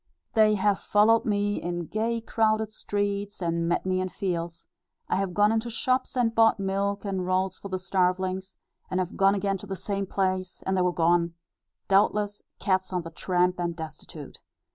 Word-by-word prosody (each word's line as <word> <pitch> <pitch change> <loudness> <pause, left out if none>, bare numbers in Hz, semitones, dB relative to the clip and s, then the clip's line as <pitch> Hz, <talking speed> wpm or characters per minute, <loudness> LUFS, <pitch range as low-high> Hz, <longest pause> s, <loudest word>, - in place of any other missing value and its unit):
They 215 -2 +5
have 200 0 +2
followed 220 +2 +4
me 205 -1 0
in 175 0 -3
gay 225 +6 -1
crowded 220 -1 +1
streets, 205 -1 -2
and 170 -1 -1
met 175 - 0
me 185 0 +1
in 185 - -2
fields; 170 -3 -4 0.4
I - - +1
have 190 -2 -2
gone 210 +1 +4
into 225 +1 0
shops 255 +3 0
and 235 -2 +2
bought 225 -2 +4
milk 200 +1 -1
and 190 -2 -2
rolls 185 +1 0
for - - -7
the 185 - -1
starvelings; 185 0 -1 0.3
and 185 - -1
have 185 -1 -2
gone 195 +1 +4
again 195 -1 -1
to 205 - -10
the 195 - -3
same 195 +1 -3
place, 185 -1 -2
and 190 - +1
they 185 - +2
were 180 0 +2
gone, 170 0 +2 0.5
doubtless, 205 +1 +2 0.2
cats 190 -2 0
on 180 -2 -1
the 165 - -8
tramp 180 +1 0
and 170 -1 -1
destitute. 160 -2 -9
195 Hz, 185 wpm, -27 LUFS, 180-205 Hz, 0.5 s, They